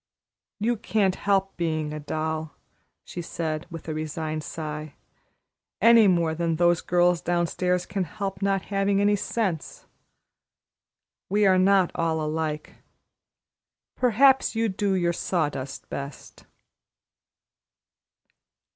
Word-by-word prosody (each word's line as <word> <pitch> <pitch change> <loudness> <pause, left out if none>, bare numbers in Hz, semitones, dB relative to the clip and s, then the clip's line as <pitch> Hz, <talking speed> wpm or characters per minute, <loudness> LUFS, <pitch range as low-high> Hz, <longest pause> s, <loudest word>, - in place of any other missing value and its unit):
"You 235 +3 +1
can't 205 -3 +1
help 195 0 0
being 155 -3 -1
a 150 - -5
doll," 155 0 -3 0.5
she 175 - -7
said, 160 -1 -4
with 165 -2 -9
a 160 - -2
resigned 155 0 -4
sigh, 150 -1 -6 0.8
"any 230 0 +7
more 170 -3 +2
than 165 0 -1
those 175 0 +3
girls 175 -1 +2
downstairs 175 +1 0
can 195 -3 -2
help 195 +2 -5
not 195 -1 +1
having 195 0 +2
any 205 +1 +3
sense. 195 -5 -3 1.4
We 205 +2 +3
are 185 -1 +5
not 190 -1 +4
all 165 -1 0
alike. 155 0 -3 1.2
Perhaps 255 +2 +4
you 225 0 +1
do 195 0 0
your 175 -2 +1
sawdust 150 -7 -3
best." 140 -1 -8
175 Hz, 110 wpm, -25 LUFS, 155-195 Hz, 1.4 s, any